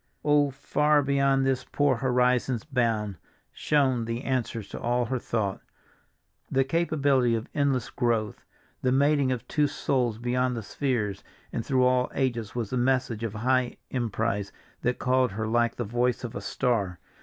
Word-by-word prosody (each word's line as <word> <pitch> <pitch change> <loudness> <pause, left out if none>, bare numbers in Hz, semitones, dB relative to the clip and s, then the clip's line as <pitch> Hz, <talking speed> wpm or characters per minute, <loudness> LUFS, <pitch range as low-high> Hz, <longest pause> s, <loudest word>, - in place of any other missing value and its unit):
"Oh, 145 -1 +4
far 150 +2 +2
beyond 140 -1 +2
this 130 -1 +1
poor 145 -4 +1
horizon's 125 -1 +1
bound" 115 - -1 0.3
shone 130 -6 +1
the 115 +3 -3
answer 120 -4 -1
to - - -8
all 120 +1 0
her 130 +2 -2
thought. 105 -5 -2 0.9
The 135 0 +2
capability 140 -5 +2
of 110 0 -4
endless 140 -4 0
growth, 115 -4 -1 0.4
the 130 - +1
mating 140 0 +3
of 125 -3 -3
two 150 -1 +2
souls 125 -5 0
beyond 125 +1 0
the 115 - -4
spheres 105 -4 -2 0.3
and 115 - -2
through 130 -1 +2
all 125 0 +3
ages 120 -5 -1
was 115 -4 -3
the 130 - 0
message 125 -3 0
of 110 -2 -3
high 125 +2 +1
emprise 110 -4 -1 0.3
that 125 0 0
called 130 -3 +2
her 110 +2 -2
like 120 +1 +1
the 120 - -2
voice 120 +3 0
of 120 - -5
a - - -4
star. 100 -8 -1
125 Hz, 160 wpm, -27 LUFS, 115-135 Hz, 0.9 s, Oh